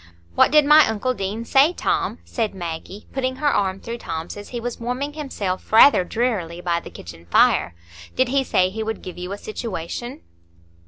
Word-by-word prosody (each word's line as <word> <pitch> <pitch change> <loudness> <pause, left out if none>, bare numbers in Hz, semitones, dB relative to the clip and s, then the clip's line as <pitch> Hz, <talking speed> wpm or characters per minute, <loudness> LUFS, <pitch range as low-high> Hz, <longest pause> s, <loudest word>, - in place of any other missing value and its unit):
"What - - +5
did 300 -1 +5
my 300 0 +7
Uncle 220 +4 -1
Deane 210 +1 -4
say, 275 +8 +4
Tom?" - - -1
said 220 -5 -2
Maggie, 175 +3 -7
putting 260 -1 -1
her 290 +1 +1
arm 190 -1 0
through 235 +3 -6
Tom's 165 -3 -5
as 205 0 -9
he 240 - -4
was 240 +1 -5
warming 250 +5 -3
himself 220 -11 -4
rather 220 -2 +7
drearily 185 -6 -2
by 175 -1 0
the - - -11
kitchen 85 0 -12
fire. 85 0 +3 0.4
"Did 255 -1 +2
he 275 +1 +2
say 185 -7 +1
he 220 +3 -5
would 220 0 -4
give 180 -1 -8
you 180 +1 -6
a 200 - -4
situation?" 225 - -6
220 Hz, 190 wpm, -22 LUFS, 185-255 Hz, 0.4 s, my